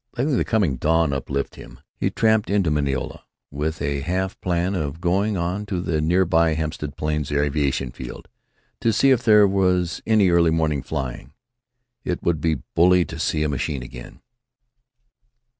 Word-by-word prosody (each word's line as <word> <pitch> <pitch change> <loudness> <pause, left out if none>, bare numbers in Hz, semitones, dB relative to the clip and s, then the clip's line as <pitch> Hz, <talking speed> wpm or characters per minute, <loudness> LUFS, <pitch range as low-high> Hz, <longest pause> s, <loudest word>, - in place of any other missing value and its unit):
Letting 135 +3 +1
the - - +2
coming 95 - 0
dawn 80 +2 +2
uplift 70 +1 -3
him, - - -12 0.2
he - - -1
tramped 110 -2 +2
into 100 -5 +1
Mineola, 70 -3 -2 0.3
with 75 +3 -3
a 70 0 -1
half 95 +5 -3
plan 90 +1 0
of 80 -4 -3
going 95 +4 0
on 90 +4 -2
to 95 -4 -2
the 80 -3 -1
near 90 +4 +2
by 80 -1 +2
Hempstead 75 -2 -4
Plains 75 -1 -2
Aviation 70 -3 0
Field, - - -9 0.5
to 115 - +2
see 135 +5 +3
if 125 -2 +3
there 105 -3 +6
was 90 -3 +1
any 105 -5 +4
early 85 -1 +4
morning 80 -3 0
flying. 65 0 -5 0.7
It 90 - -3
would 85 -3 0
be 80 -3 0
bully 90 +1 +4
to 80 - -8
see 75 -1 0
a - - +1
machine 70 -1 -3
again! - - -11
80 Hz, 165 wpm, -22 LUFS, 75-95 Hz, 0.7 s, there